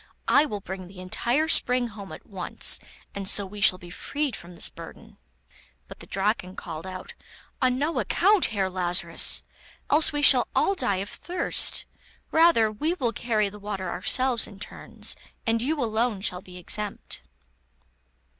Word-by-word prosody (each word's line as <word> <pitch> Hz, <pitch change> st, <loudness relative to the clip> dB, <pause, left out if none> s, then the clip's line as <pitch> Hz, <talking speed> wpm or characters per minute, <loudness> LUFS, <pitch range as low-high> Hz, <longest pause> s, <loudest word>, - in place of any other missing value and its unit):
I 295 Hz, -, +5 dB
will 210 Hz, -8 st, -5 dB
bring 190 Hz, -1 st, -7 dB
the 185 Hz, 0 st, -13 dB
entire 240 Hz, -, 0 dB
spring 250 Hz, -5 st, +4 dB
home 200 Hz, -3 st, -10 dB
at -, -, -10 dB
once, 195 Hz, -3 st, -1 dB, 0.3 s
and 200 Hz, -1 st, -3 dB
so 200 Hz, -, +1 dB
we 205 Hz, +2 st, -9 dB
shall 185 Hz, -3 st, +6 dB
be 175 Hz, -1 st, -12 dB
freed 285 Hz, +7 st, -3 dB
from 175 Hz, +1 st, -11 dB
this -, -, 0 dB
burden.' -, -, -12 dB, 0.7 s
But -, -, -11 dB
the -, -, -11 dB
Draken 195 Hz, -1 st, -1 dB
called 165 Hz, +1 st, -7 dB
out: 185 Hz, 0 st, -7 dB, 0.5 s
'On 255 Hz, -1 st, +3 dB
no 300 Hz, +5 st, 0 dB
account, 410 Hz, -2 st, +3 dB
Herr 200 Hz, -3 st, -1 dB
Lazarus, 180 Hz, -1 st, +1 dB, 0.5 s
else 305 Hz, +2 st, +6 dB
we 295 Hz, -1 st, -2 dB
shall 255 Hz, -3 st, +7 dB
all 395 Hz, -, +3 dB
die 200 Hz, -, -1 dB
of -, -, -10 dB
thirst; 355 Hz, 0 st, +1 dB, 0.5 s
rather 320 Hz, -10 st, +5 dB
will 310 Hz, -, -2 dB
we 240 Hz, -4 st, +1 dB
carry 215 Hz, -2 st, 0 dB
the 205 Hz, +1 st, -9 dB
water 195 Hz, -3 st, -4 dB
ourselves 255 Hz, +5 st, +2 dB
in 200 Hz, -2 st, -13 dB
turns, -, -, -2 dB, 0.3 s
and 225 Hz, 0 st, +1 dB
you 295 Hz, +5 st, -1 dB
alone 225 Hz, -3 st, 0 dB
shall 180 Hz, -3 st, -3 dB
be 180 Hz, -1 st, -12 dB
exempt. 205 Hz, +3 st, -4 dB
210 Hz, 165 wpm, -26 LUFS, 190-255 Hz, 0.7 s, shall